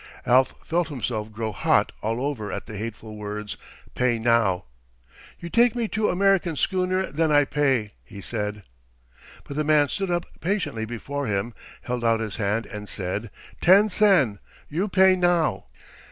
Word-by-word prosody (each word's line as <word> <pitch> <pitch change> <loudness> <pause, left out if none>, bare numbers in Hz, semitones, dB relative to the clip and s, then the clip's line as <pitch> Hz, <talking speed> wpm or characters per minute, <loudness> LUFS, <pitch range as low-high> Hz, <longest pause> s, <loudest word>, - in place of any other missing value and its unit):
Alf 130 +2 +4
felt 170 0 0
himself 115 -7 -4
grow 110 0 -3
hot 95 - +2
all 115 +2 -1
over 125 -8 -3
at - - -5
the 110 - -9
hateful 110 0 -7
words 105 0 -5 0.4
"pay 125 -2 +1
now." 115 - +2 0.7
"You 170 0 -8
take 235 0 +4
me 235 -2 -1
to 215 0 0
American 190 -3 +2
schooner; 185 +3 0
then 160 +2 +1
I 145 -1 +5
pay," 135 -7 +1
he 100 - -11
said. 105 0 -4 0.8
But 140 - -8
the 155 - +1
man 150 -2 +3
stood 195 -1 -2
up 175 0 0
patiently 160 - -2
before 135 +5 -4
him, 105 +3 -2 0.3
held 125 -1 -3
out 115 -1 +3
his 110 -3 -4
hand, 110 +1 0
and 105 -2 -8
said, 100 +3 -3 0.3
"Ten 200 +4 +6
sen. 180 - +4 0.3
You 175 +8 -1
pay 190 -1 +5
now." 175 -3 +1
130 Hz, 160 wpm, -24 LUFS, 110-175 Hz, 0.8 s, Ten